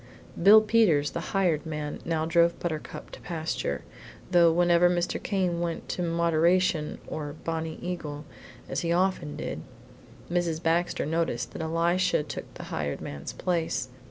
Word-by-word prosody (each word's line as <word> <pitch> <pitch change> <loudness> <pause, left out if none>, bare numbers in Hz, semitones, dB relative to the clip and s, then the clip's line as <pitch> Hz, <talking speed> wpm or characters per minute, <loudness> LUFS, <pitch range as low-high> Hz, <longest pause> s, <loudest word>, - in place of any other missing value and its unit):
Bill 210 +4 +9
Peters, 210 -10 +3
the - - -3
hired 180 -6 +1
man, 150 -2 -4
now 160 -1 0
drove 170 +1 +3
Buttercup 160 -3 -5
to - - -11
pasture, 160 - -3 0.5
though 170 -2 +6
whenever 175 +1 +4
Mr. 175 -1 -1
Came 185 -4 0
went 170 -1 -3
to - - -2
Moderation 170 -1 +2
or 145 -2 -5
Bonnie 160 -1 -3
Eagle, 155 -5 -5 0.4
as - - -2
he 170 - -1
often 175 -4 +1
did, - - -4 0.7
Mrs. 170 -2 0
Baxter 170 +2 +1
noticed 165 +2 -1
that - - -6
Elisha 170 +1 +1
took - - -7
the - - -8
hired 75 -2 -2
man's 70 -1 -6
place. 165 -7 -1
170 Hz, 145 wpm, -27 LUFS, 155-175 Hz, 0.7 s, Bill